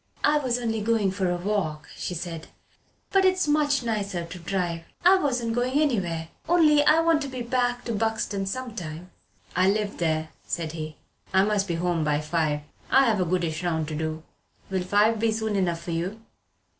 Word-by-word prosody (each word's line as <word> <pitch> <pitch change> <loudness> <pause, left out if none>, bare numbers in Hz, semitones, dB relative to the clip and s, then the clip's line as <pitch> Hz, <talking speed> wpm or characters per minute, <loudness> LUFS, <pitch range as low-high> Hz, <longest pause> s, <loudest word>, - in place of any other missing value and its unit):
"I 300 0 +4
was 250 -4 0
only 225 -3 -1
going 215 -3 +2
for 190 -1 -1
a 175 - 0
walk," 175 -6 -2
she 180 - -4
said, 165 -1 -5 0.6
"but 390 -1 +4
it's 370 -2 +3
much 295 -3 +2
nicer 200 -6 -2
to 180 +2 -9
drive. 175 -1 -2 0.2
I 380 +2 +8
wasn't 245 -7 0
going 250 +4 +1
anywhere. 180 - 0 0.2
Only 305 -4 +5
I 310 +2 +5
want 330 -2 +3
to 280 - -3
get 250 -3 -6
back 245 -1 +1
to 235 - -2
Buxton 215 -2 -1
some 250 +2 -4
time." 170 -1 -7 0.4
"I 185 +1 +4
live 205 0 -1
there," 160 -2 0
said 165 -2 -3
he. 155 -2 -6 0.4
"I 190 - +6
must 205 -1 +1
be 170 - -1
home 170 -1 0
by 150 -1 +1
five. 150 -1 0 0.3
I've 230 -7 +4
a - - +2
goodish 170 -1 -1
round 160 -3 0
to 155 - -4
do. 160 0 -3 0.5
Will 190 -1 0
five 205 +4 +3
be 225 0 +2
soon 220 -1 -1
enough 175 -3 0
for 170 - -5
you?" 175 +6 -2
200 Hz, 190 wpm, -26 LUFS, 170-245 Hz, 0.6 s, I